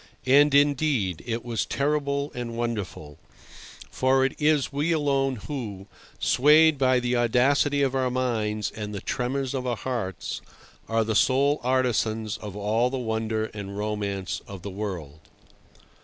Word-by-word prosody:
And, 140 +2 +5
indeed, 140 - +2
it 115 0 -3
was 115 -2 -1
terrible 140 0 -1
and 120 -2 -5
wonderful; 105 -11 -4 0.7
for 130 +1 +2
it 135 - -1
is 150 -2 +2
we 150 +4 0
alone 140 -4 +1
who, 110 -10 -5 0.3
swayed 150 +3 +5
by 130 -1 +4
the 125 0 0
audacity 140 +4 +3
of 135 -1 +1
our 130 -1 +1
minds 110 -5 -1
and 105 -1 -6
the 100 - -5
tremors 130 +2 -2
of 130 -2 -3
our 120 - 0
hearts, 95 - -4 0.5
are 115 0 +2
the 110 0 -1
sole 140 +6 +3
artisans 115 -4 0
of 105 -2 -8
all 110 +4 +1
the 135 - -3
wonder 110 -2 -1
and 100 -1 -7
romance 100 -3 -3
of 100 -3 -9
the 100 - -5
world. 90 -7 -5
125 Hz, 145 wpm, -26 LUFS, 105-135 Hz, 0.7 s, And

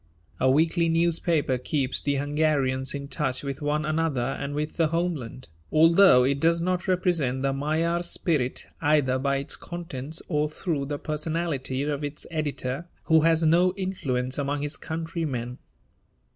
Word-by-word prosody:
A 130 - +3
weekly 165 +4 +3
newspaper 165 -5 +2
keeps 130 0 0
the 140 -1 0
Hungarians 140 -2 0
in 140 0 -5
touch 130 -1 -2
with 140 0 -5
one 150 +1 0
another 155 -5 0
and 140 0 -4
with 150 +1 -3
the 165 -2 +3
homeland, 160 -7 -3 0.2
although 165 -3 +6
it 140 +2 +1
does 165 +2 +3
not 180 +1 -1
represent 170 -8 +1
the 135 0 +1
Magyar 160 +5 0
spirit 155 -6 -1 0.2
either 145 -4 +2
by 140 +1 +1
its 140 0 -3
contents 160 -3 -7
or 150 -2 0
through 155 -2 -2
the 145 0 -3
personality 150 -4 -2
of 145 0 -2
its 145 +1 -5
editor, 150 -1 -3 0.2
who 160 -1 +4
has 165 0 +3
no 175 +3 +4
influence 135 -10 -2
among 145 +1 -1
his 145 +1 -3
countrymen. 160 -7 -4
150 Hz, 150 wpm, -26 LUFS, 135-165 Hz, 0.2 s, although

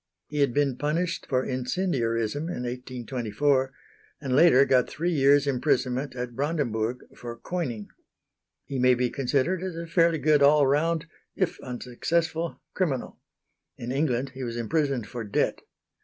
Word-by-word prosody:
He 150 - -3
had 140 -3 +3
been 140 -1 +1
punished 165 +3 -1
for 130 -1 +1
incendiarism 125 - -1
in 170 -8 -4
1824, 125 +2 -1 0.5
and 135 -3 -1
later 140 -3 +6
got 130 -2 +3
three 170 +3 -1
years' 145 -2 +4
imprisonment 130 -1 0
at 125 -1 -5
Brandenburg 125 -5 -1
for 120 -1 -7
coining. 125 - -4 0.8
He 135 - -4
may 125 0 +5
be 125 0 0
considered 140 +7 0
as 185 -2 -4
a 170 0 -5
fairly 165 0 +3
good 150 0 +3
all 145 +1 +6
round 160 +4 +1 0.3
if 185 -3 -1
unsuccessful 160 +7 -2
criminal. 150 -10 -2 0.6
In 120 +1 -5
England 135 -2 0
he 130 0 -7
was 120 -1 -4
imprisoned 135 0 0
for 120 +1 -6
debt. 100 - 0
135 Hz, 140 wpm, -26 LUFS, 125-155 Hz, 0.8 s, later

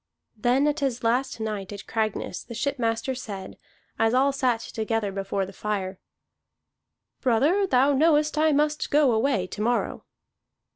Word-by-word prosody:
Then 245 +6 +2
at 295 +1 +1
his 265 -4 -1
last 245 +2 0
night 210 -3 -4
at 200 -1 -8
Cragness 215 -5 -2
the 235 - -9
shipmaster 255 -2 -1
said, 205 -7 -7 0.4
as 225 +2 +3
all 275 +2 +4
sat 255 -4 +1
together 220 -2 -2
before 195 0 -2
the 195 - -11
fire: 195 -3 -3 1.2
"Brother, 290 - +3
thou 270 -1 +4
knowest 300 +1 +3
I 310 +1 +3
must 300 +1 +1
go 290 -3 +4
away 225 -3 +1
to 200 - -7
morrow." 240 +2 -1
240 Hz, 145 wpm, -25 LUFS, 215-280 Hz, 1.2 s, all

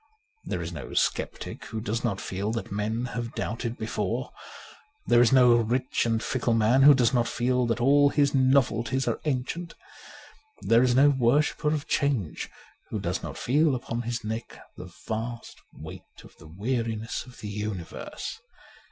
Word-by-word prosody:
There - - -3
is - - -6
no - - -7
sceptic - - -2
who 110 - -5
does 110 +2 -3
not 100 -6 -1
feel 100 +3 -3
that 115 -4 -4
men 110 +4 -2
have 120 -1 -4
doubted 115 +1 -3
before. 110 +2 -3 0.7
There 120 - +5
is 120 - +4
no 125 -2 +6
rich 120 +2 0
and 115 0 0
fickle 120 -2 0
man 115 +4 +4
who 145 +1 +9
does 120 -1 +2
not 120 -2 +2
feel 125 0 0
that 115 0 0
all 145 +3 +5
his 145 -1 +2
novelties 130 -2 +2
are - - -1
ancient. 155 +5 -3 0.9
There 115 +1 +4
is 125 -1 +3
no 140 +3 +6
worshipper 140 +4 +1
of 155 0 -2
change 135 - -1 0.4
who - - -3
does - - -2
not - - -7
feel 145 +2 +2
upon 120 -1 -4
his 120 0 -4
neck 110 +2 -5 0.2
the - - -9 0.2
vast 115 +1 -5
weight - - -12
of - - -16
the - - -14
weariness 110 +4 -3
of 125 - -14
the 105 - -5
universe. 105 -4 -6
120 Hz, 165 wpm, -27 LUFS, 110-130 Hz, 0.9 s, who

